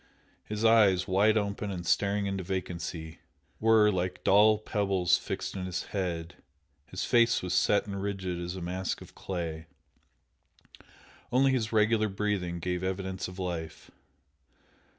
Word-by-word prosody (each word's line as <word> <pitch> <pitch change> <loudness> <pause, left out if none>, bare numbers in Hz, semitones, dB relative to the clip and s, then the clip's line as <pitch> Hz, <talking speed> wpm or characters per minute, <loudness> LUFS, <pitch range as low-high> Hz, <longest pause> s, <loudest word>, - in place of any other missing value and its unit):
His 105 +1 -3
eyes, 105 -5 +5
wide 105 +4 +3
open 100 0 -2
and 90 -3 -5
staring 100 +3 +1
into 95 -1 -2
vacancy, 85 -3 -5 0.4
were, 110 -1 +5
like 90 -1 -3
dull 105 +2 +5
pebbles, 100 -4 +1
fixed - - -5
in 95 -1 -4
his 90 0 -3
head, 85 -4 -3 0.5
his 95 - -4
face 120 -3 +3
was 90 0 -2
set 100 +2 +3
and 100 -1 -5
rigid 95 -3 -3
as 90 +1 -4
a 95 - -6
mask 90 +2 -3
of - - -13
clay 80 -4 -5 1.6
only 135 +2 +4
his 115 -5 -1
regular 110 0 +3
breathing 95 -3 -2
gave 90 +1 -3
evidence 95 0 -3
of 90 +1 -10
life. 85 -4 -5
95 Hz, 140 wpm, -29 LUFS, 90-105 Hz, 1.6 s, eyes